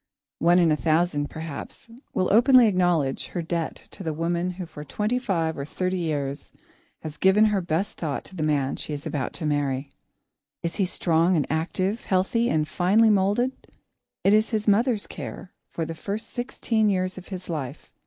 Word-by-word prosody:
One 170 +3 +5
in 170 -3 +4
a - - +4
thousand, 155 -2 +1
perhaps, 160 +4 -7 0.2
will 185 +1 +1
openly 250 +2 +7
acknowledge 175 -9 +1
her 170 - -1
debt 165 0 -2 0.2
to - - -9
the 160 -4 -3
woman 170 +2 -1
who 180 0 -6
for 155 -3 -9
twenty 210 - -1
five 170 -9 -1
or - - -2
thirty 185 +5 -2
years 145 -4 -3 0.5
has 155 -1 -7
given 190 +5 +5
her 210 -3 +2
best 175 +4 -2
thought 150 -4 -3
to 190 - -12
the 165 - -4
man 145 -3 +1
she 150 - -4
is 145 0 -6
about 135 -4 -2
to 165 - -4
marry. 140 -2 -1 0.7
Is 170 0 -3
he 195 - +2
strong 170 0 +2
and 150 -4 +2
active, 185 +7 -1
healthy 200 +6 +1
and 155 -1 +1
finely 205 +7 +4
moulded? 205 +6 +2 0.7
It 195 - +5
is 215 +1 +4
his 220 -2 -2
mother's 220 +1 +3
care 185 - -8 0.2
for 165 - -3
the 165 - -5
first 205 +7 -5
sixteen 230 -3 0
years 185 -1 -1
of 185 - -14
his 185 -2 -7
life. 150 -7 -5
175 Hz, 185 wpm, -25 LUFS, 155-205 Hz, 0.7 s, openly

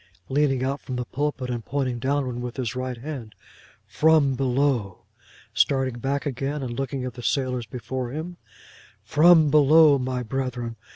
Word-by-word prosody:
'—leaning 135 -2 +1
out 135 +2 -2
of 130 - -2
the 125 0 -3
pulpit, 135 -1 -3
and 120 -2 -4
pointing 130 -2 -2
downward 130 -1 -1
with 125 +1 -6
his 125 -2 -3
right 130 -1 -4
hand: 120 -5 -7 0.5
'From 155 -3 +3
below!'—starting 130 0 -1
back 140 +3 -2
again, 140 +1 -3
and 120 -2 -4
looking 135 +1 -3
at 125 - -5
the 120 - -9
sailors 125 -2 -1
before 125 +1 -5
him: 160 +6 -6 0.7
'From 155 +5 +5
below, 150 0 +6
my 125 -1 -2
brethren. 125 -1 -3
130 Hz, 150 wpm, -24 LUFS, 125-145 Hz, 0.7 s, below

